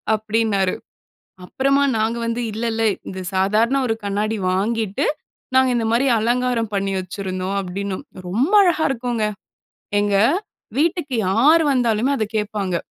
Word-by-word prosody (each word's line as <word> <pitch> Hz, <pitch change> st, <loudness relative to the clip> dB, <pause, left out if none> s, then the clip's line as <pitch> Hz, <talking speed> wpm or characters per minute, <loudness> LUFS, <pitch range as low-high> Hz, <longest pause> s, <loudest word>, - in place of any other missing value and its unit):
அப்படின்னாரு. 215 Hz, -3 st, 0 dB, 0.7 s
அப்புறமா 275 Hz, +7 st, +1 dB
நாங்க 220 Hz, +2 st, 0 dB
வந்து, 230 Hz, +1 st, -2 dB
"இல்ல 225 Hz, +3 st, -3 dB
இல்ல, 225 Hz, 0 st, -1 dB, 0.3 s
இந்த 190 Hz, 0 st, -6 dB
சாதாரண 215 Hz, +7 st, +2 dB
ஒரு 225 Hz, -, 0 dB
கண்ணாடி 210 Hz, +2 st, -1 dB
வாங்கிட்டு, 220 Hz, +5 st, -1 dB, 0.5 s
நாங்க 260 Hz, -1 st, +5 dB
இந்த 225 Hz, -1 st, 0 dB
மாதிரி 260 Hz, +4 st, +2 dB
அலங்காரம் 240 Hz, -1 st, 0 dB
பண்ணி 195 Hz, 0 st, -1 dB
வச்சிருந்தோம்." 185 Hz, 0 st, -4 dB
அப்படின்னோம். 195 Hz, +1 st, -5 dB, 0.2 s
ரொம்ப 255 Hz, -, 0 dB
அழகா 340 Hz, -4 st, +2 dB
இருக்குங்க. 240 Hz, -3 st, -2 dB, 0.8 s
எங்க 205 Hz, -1 st, +1 dB, 0.6 s
வீட்டுக்கு, 320 Hz, -4 st, 0 dB
யார் 280 Hz, -, +5 dB
வந்தாலுமே, 240 Hz, -1 st, +1 dB
அத 220 Hz, -, +1 dB
கேப்பாங்க. 205 Hz, -4 st, -1 dB
220 Hz, 125 wpm, -21 LUFS, 200-250 Hz, 0.8 s, நாங்க